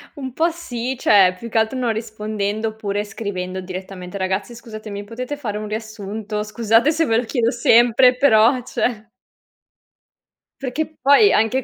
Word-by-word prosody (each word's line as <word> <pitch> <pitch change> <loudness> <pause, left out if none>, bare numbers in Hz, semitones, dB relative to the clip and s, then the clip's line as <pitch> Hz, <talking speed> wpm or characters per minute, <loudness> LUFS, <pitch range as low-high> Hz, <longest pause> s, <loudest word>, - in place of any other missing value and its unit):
Un 265 -3 -6
po' 330 +5 +2
sì, 260 -7 -5
cioè, 195 -6 +5
più 235 - -7
che 230 - -2
altro 220 +4 +1
non 240 -3 0
rispondendo, 215 -1 -3
oppure 205 -2 -3
scrivendo 190 -3 -5
direttamente: 185 0 -7
"Ragazzi 190 +4 -2
scusatemi, 215 -3 -8
potete 250 +6 -6
fare 215 -7 -4
un 215 0 -5
riassunto? 215 -1 -5
Scusate 225 +5 +2
se 325 +1 +1
ve 225 - +1
lo 240 - +1
chiedo 235 -1 0
sempre, 240 +1 +4
però 250 -1 +4
cioè" 225 -2 -3 1.5
Perché 305 +4 -3
poi 285 - +6
anche 225 +4 +2
225 Hz, 150 wpm, -20 LUFS, 210-250 Hz, 1.5 s, poi